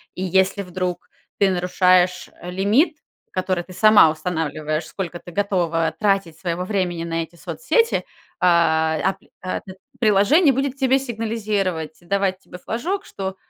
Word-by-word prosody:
И 185 - -4
если 190 +2 +2
вдруг 180 -1 -4 0.3
ты 200 - +4
нарушаешь, 180 0 +2
э, 175 - -7
лимит, 215 - +2 0.3
который 185 -1 -1
ты 185 - -13
сама 210 -3 +6
устанавливаешь, 155 -1 -2
сколько 175 -3 -5
ты 175 - -12
готова 170 -4 0
тратить 195 -6 +1
своего 175 0 -2
времени 180 -4 -1
на 165 0 -2
эти 165 +1 -14
соцсети, 465 - 0 0.3
а, 160 -3 +3
ап 190 +1 +1 0.2
а 185 - -3
пь 190 - -11 0.3
приложение 240 - +4
будет 270 +1 -2
тебе 265 -1 +3
сигнализировать, 215 - -2
давать 190 +1 0
тебе 180 - -12
флажок, 345 - -3
что: 190 -1 -5
185 Hz, 140 wpm, -21 LUFS, 170-210 Hz, 0.3 s, сама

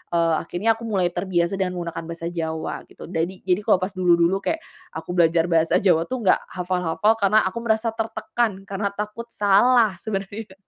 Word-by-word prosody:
eee, 165 -1 +3
akhirnya 215 +7 0
aku 230 - -8
mulai 185 -5 +1
terbiasa 175 0 -1
dengan 180 -1 0
menggunakan 170 -1 -5
bahasa 165 0 -5
Jawa 160 -2 -3
gitu. - - -13
Dadi 180 +2 -3
jadi 185 +1 +1
kalau 180 - +4
pas 185 - -2
dulu-dulu 180 -1 +3
kayak 320 +10 -2 0.3
aku - - -8
belajar 165 0 +3
bahasa 165 0 +3
Jawa 170 -4 +3
tuh 255 -2 -3
nggak 185 - +4
hafal-hafal 180 +3 +1
karena 210 +1 +4
aku 190 - -9
merasa 220 +1 +1
tertekan 225 -1 -2
karena 200 +1 -1
takut 210 +3 -5
salah 210 +1 +4
sebenarnya. 200 0 -5
190 Hz, 175 wpm, -23 LUFS, 170-215 Hz, 0.3 s, kalau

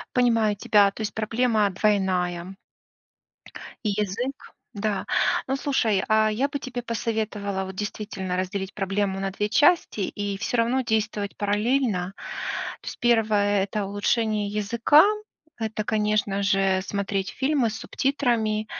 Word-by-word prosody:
Понимаю 230 -4 +3
тебя, 200 0 +4
то 200 - -13
есть 215 -1 -3
проблема 220 -1 +1
двойная. 185 -2 0 1.3
И 210 - +1
язык. 210 +7 -3 0.2
Да. 205 -2 -1 0.4
Ну, 270 - +1
слушай, 230 -9 +1
а, 215 0 +4
я 260 +7 0
бы 285 - -3
тебе 250 -2 -5
посоветовала 215 -4 -2
вот 190 0 -7
действительно 200 -2 -4
разделить 190 +1 -3
проблему 195 0 -1
на 195 0 -1
2 210 +2 -2
части 295 -2 +3
и 200 +1 -3
всё 235 +3 -1
равно 245 +3 +2
действовать 215 -3 -1
параллельно. 205 -2 0 0.7
То - - -15
есть, - - -8
1- 210 -4 +3
это 205 0 -3
улучшение 210 +1 0
языка, 230 - +4 0.5
это, 220 -1 -3
конечно 210 -2 0
же, 195 -1 +2
смотреть 200 -1 -2
фильмы 265 -3 +1
с 215 - -6
субтитрами, 230 -7 0
210 Hz, 130 wpm, -25 LUFS, 200-230 Hz, 1.3 s, тебя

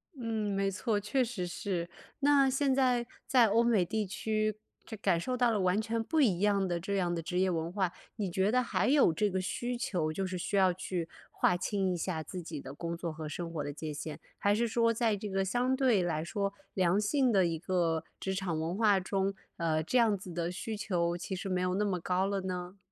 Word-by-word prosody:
嗯， 220 -5 -2
没 195 0 +1
错， 210 +2 0
确 235 +6 +1
实 225 -7 -3
是。 175 -1 -3 0.3
那 280 -1 +5
现 270 +1 +2
在 250 -2 +2 0.2
在 245 -4 +5
欧 225 +3 +3
美 225 -6 +3
地 215 +3 -1
区 215 +2 -1 0.3
这 220 - -7
感 175 -4 +2
受 255 +9 -2
到 245 -1 +3
了 215 - +1
完 185 +1 +2
全 225 +1 -2
不 315 +6 +1
一 200 -10 +3
样 200 -1 +2
的 175 -1 -1
这 200 +4 -3
样 180 -3 +1
的 170 - -2
职 180 +2 -2
业 190 0 +3
文 165 -1 -2
化， 190 -2 0 0.2
你 200 -5 -2
觉 190 +4 +2
得 250 +1 +3
还 - - 0
有 270 - +5
这 205 +6 +1
个 190 -1 -1
需 240 +6 -3
求， 175 -9 -1
就 190 +5 -2
是 185 0 -3
需 180 - -3
要 190 -2 +5
去 180 -2 -3 0.2
划 180 - +2
清 190 +1 0
一 - - -2
下 165 -2 -2
自 180 +3 -6
己 160 -3 -6
的 135 - -8
工 170 +3 -4
作 170 -1 -3
和 155 -1 -6
生 170 +2 -5
活 155 - -2
的 145 - -4
界 150 +1 -5
限？ 150 +1 -6 0.2
还 205 0 +3
是 235 +2 +1
说 230 0 +2
在 225 -2 +1
这 205 +1 -5
个 195 0 0
相 245 +6 +1
对 255 -7 +3
来 165 -3 -1
说 200 +3 -2 0.2
良 185 +1 +2
性 255 +4 +2
的 195 -4 +4
一 165 -2 -1
个 170 -2 0 0.2
职 190 - -2
场 185 -4 -2
文 165 +3 -2
化 210 -2 +4
中， 195 +1 -1 0.2
呃， 160 -2 +1
这 250 - +1
样 220 -3 +4
子 185 -1 -9
的 170 0 -2
需 215 +4 -4
求 175 -5 0
其 185 +2 -4
实 185 - -5
没 185 -1 0
有 180 0 0
那 210 +2 +1
么 190 -3 0
高 180 +2 0
了 200 0 -1
呢？ 180 0 -5
195 Hz, 255 characters per minute, -31 LUFS, 175-220 Hz, 0.3 s, 那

